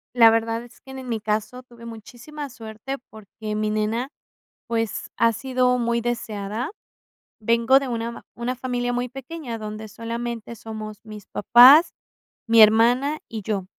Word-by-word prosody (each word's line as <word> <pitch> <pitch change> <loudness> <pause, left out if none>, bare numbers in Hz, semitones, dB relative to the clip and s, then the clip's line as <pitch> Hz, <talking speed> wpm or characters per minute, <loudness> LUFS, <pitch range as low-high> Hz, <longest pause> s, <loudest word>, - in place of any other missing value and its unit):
La 230 -2 +8
verdad 225 +1 0
es 240 - -17
que 265 - -13
ne 265 - -7
en 255 - -9
mi 225 -2 -1
caso 215 +4 -2
tuve 240 -2 -17
muchísima 245 +6 -9
suerte 225 +3 -7
porque 215 0 -8
mi 215 0 -1
nena, 220 +6 -2 0.5
pues, 225 -2 -3
ha 230 +1 +3
sido 250 +1 +1
muy 235 0 0
deseada. 230 - -3 0.7
Vengo 230 +4 +4
de 275 - -5
una 235 -1 -3
ma - - -10
una 245 +2 -3
familia 245 -1 -2
muy 245 +1 -2
pequeña, 270 -1 -7
donde 215 0 -7
solamente 230 +1 -6
somos 215 -1 -8
mis 215 -2 -10
papás, 255 - +7 0.5
mi 230 -1 +6
hermana 240 +7 +5
y 220 -2 -6
yo. 195 -2 -3
230 Hz, 155 wpm, -23 LUFS, 220-250 Hz, 0.7 s, La